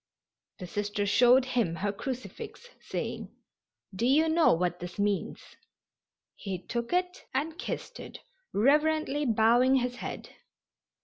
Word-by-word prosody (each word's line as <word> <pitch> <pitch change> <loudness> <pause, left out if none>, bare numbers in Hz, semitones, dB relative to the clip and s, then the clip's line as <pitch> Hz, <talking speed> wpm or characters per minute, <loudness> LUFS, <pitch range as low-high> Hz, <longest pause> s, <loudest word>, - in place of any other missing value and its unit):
The 185 - -7
Sister 205 +2 -2
showed 245 +5 +5
him 235 -10 0
her 200 +4 -1
crucifix, 250 - -7
saying: - - -5 0.7
"Do 230 +6 0
you 305 +5 +4
know 325 0 +4
what 175 +1 0
this 175 0 -8
means?" 205 -1 -1 1.0
He 195 -3 -5
took 235 +6 -4
it 360 +1 -1
and 310 +4 -1
kissed - - -5
it, - - -9 0.3
reverently 295 +4 +2
bowing 235 +4 +4
his 250 -1 0
head. - - -6
240 Hz, 125 wpm, -29 LUFS, 205-290 Hz, 1.0 s, showed